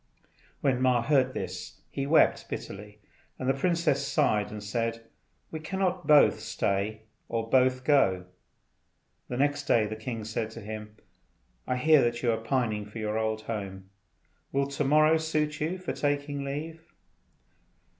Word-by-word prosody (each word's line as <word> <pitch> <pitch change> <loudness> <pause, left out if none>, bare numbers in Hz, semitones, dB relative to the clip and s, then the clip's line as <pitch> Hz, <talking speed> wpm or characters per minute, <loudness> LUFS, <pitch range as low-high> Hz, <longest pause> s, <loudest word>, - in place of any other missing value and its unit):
When 130 -2 +1
Ma 125 -2 +3
heard 130 -1 +2
this 90 -1 -6
he 140 0 -3
wept 155 +2 +3
bitterly, 105 +1 -7 0.4
and 130 - -4
the 135 - +4
princess 170 0 +1
sighed 105 -7 +2
and 105 -1 -7
said, 115 +2 -2 0.5
"We 160 - -4
cannot 185 0 -2
both 150 -1 +6
stay 105 +3 -2 0.3
or 115 -1 -2
both 130 +1 +3
go." 100 -11 +3 1.0
The 125 - -4
next 145 +1 +1
day 115 -5 +3
the 105 +1 -4
king 110 0 -5
said 110 0 -3
to 115 +1 -10
him, 105 0 -7 0.7
"I 125 - 0
hear 155 +2 +5
that 120 0 0
you 120 - +3
are 110 - 0
pining 110 -3 -1
after 105 - -10
your 110 0 -1
old 110 0 -1
home. 95 -4 -6 0.6
Will 140 0 +1
to 140 +1 -1
morrow 155 +3 +5
suit 155 -2 -1
you 165 +5 -1
for 185 - -4
taking 145 -1 -1
leave?" 155 +4 -5
125 Hz, 155 wpm, -28 LUFS, 110-145 Hz, 1.0 s, both